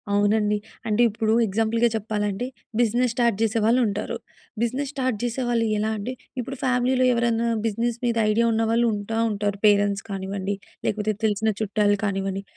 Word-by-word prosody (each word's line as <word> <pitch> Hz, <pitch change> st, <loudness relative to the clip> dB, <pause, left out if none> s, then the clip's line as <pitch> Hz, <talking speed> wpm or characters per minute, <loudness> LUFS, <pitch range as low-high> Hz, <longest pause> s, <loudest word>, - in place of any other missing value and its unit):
అవునండి. 210 Hz, +1 st, +2 dB, 0.3 s
అంటే 215 Hz, +2 st, +2 dB
ఇప్పుడు 220 Hz, +1 st, 0 dB
ఎగ్జాంపుల్‌గా 225 Hz, +3 st, +2 dB
చెప్పాలంటే 210 Hz, 0 st, -2 dB, 0.3 s
బిజినెస్ 240 Hz, +1 st, +2 dB
స్టార్ట్ 235 Hz, -4 st, +2 dB
చేసే 225 Hz, 0 st, +2 dB
వాళ్ళు 235 Hz, +3 st, +4 dB
ఉంటారు. 205 Hz, 0 st, -3 dB, 0.4 s
బిజినెస్ 260 Hz, +4 st, -1 dB
స్టార్ట్ 255 Hz, -5 st, -1 dB
చేసే 240 Hz, +2 st, -1 dB
వాళ్ళు 230 Hz, -1 st, +2 dB
ఎలా 215 Hz, +1 st, 0 dB
అంటే 220 Hz, +5 st, -4 dB, 0.3 s
ఇప్పుడు 265 Hz, +3 st, -6 dB
ఫ్యామిలీలో 255 Hz, 0 st, +2 dB
ఎవరైనా 235 Hz, -1 st, +1 dB, 0.2 s
బిజినెస్ 230 Hz, +2 st, -1 dB
మీద 235 Hz, -1 st, +1 dB, 0.2 s
ఐడియా 230 Hz, +2 st, +2 dB
ఉన్నవాళ్ళు 225 Hz, +1 st, +2 dB
ఉంటా 210 Hz, +2 st, -3 dB
ఉంటారు. 205 Hz, -1 st, -1 dB
పేరెంట్స్ 205 Hz, -1 st, +3 dB
కానివ్వండి, 195 Hz, 0 st, -3 dB, 0.3 s
లేకపోతే 215 Hz, +1 st, 0 dB
తెలిసిన 220 Hz, +1 st, +1 dB
చుట్టాలు 205 Hz, -1 st, +2 dB
కానివ్వండి. 195 Hz, -1 st, -2 dB
220 Hz, 150 wpm, -24 LUFS, 205-235 Hz, 0.4 s, వాళ్ళు